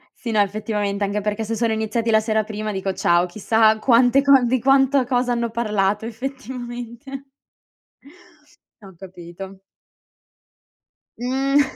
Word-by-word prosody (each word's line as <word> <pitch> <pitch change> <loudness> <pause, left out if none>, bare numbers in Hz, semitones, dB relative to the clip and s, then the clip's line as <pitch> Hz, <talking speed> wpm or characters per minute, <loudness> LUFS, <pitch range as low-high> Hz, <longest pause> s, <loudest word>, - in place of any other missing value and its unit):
Sì, 235 - -6
no 215 - +1
effettivamente, 205 0 -1
anche 200 +1 -1
perché 210 +2 -2
se 225 +1 -3
sono 230 0 0
iniziati 220 +1 -2
la 220 - +5
sera 220 0 0
prima 215 0 -4
dico, 195 -1 -3
ciao, 175 -1 +2
chissà 220 +4 +2
quante 245 +3 +4
co 275 -1 +5
di 255 +2 +1
quanto 270 +1 +3
cosa 245 0 0
hanno 235 -1 -1
parlato 210 -2 -1
effettivamente 245 +2 -7 1.6
Ho 195 -1 -13
capito. 190 +1 -11 1.6
Mh. 270 +3 +1
225 Hz, 130 wpm, -21 LUFS, 205-245 Hz, 1.6 s, la